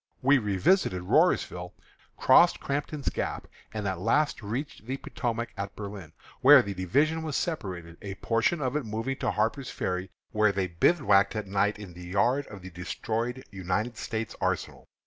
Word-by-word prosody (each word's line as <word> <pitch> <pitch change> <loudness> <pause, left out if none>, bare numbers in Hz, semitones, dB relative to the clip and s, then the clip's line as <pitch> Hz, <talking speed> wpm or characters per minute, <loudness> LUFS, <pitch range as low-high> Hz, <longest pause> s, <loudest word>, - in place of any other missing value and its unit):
We 135 +1 +5
revisited 100 - +2
Rhorersville, 90 0 +2 0.4
crossed - - +6
Crampton's 145 +1 -2
Gap, - - -3 0.3
and 105 -2 -3
at 95 -2 -2
last 130 +8 +1
reached 115 +2 -5
the 135 +1 -2
Potomac 120 -3 -3
at 100 -1 -5
Berlin, 100 -6 -8 0.3
where 140 -1 +9
the 100 -1 -4
division 145 - +1
was 155 -3 -3
separated, 90 - -3
a 100 -2 -6
portion 115 - +1
of 130 0 -1
it 150 - 0
moving 115 +5 -3
to - - -1
Harper's 115 +5 -1
Ferry, 90 0 -3 0.2
where 105 -1 +3
they 95 -1 0
bivouacked 100 - +3
at 110 -1 -2
night 100 +2 +1
in 100 -4 -9
the 90 0 -10
yard 120 +9 +1
of 100 -3 -10
the 95 - -8
destroyed 115 +8 -3
United 95 +5 -2
States 110 -1 -4
arsenal. - - -2
105 Hz, 165 wpm, -28 LUFS, 95-130 Hz, 0.4 s, where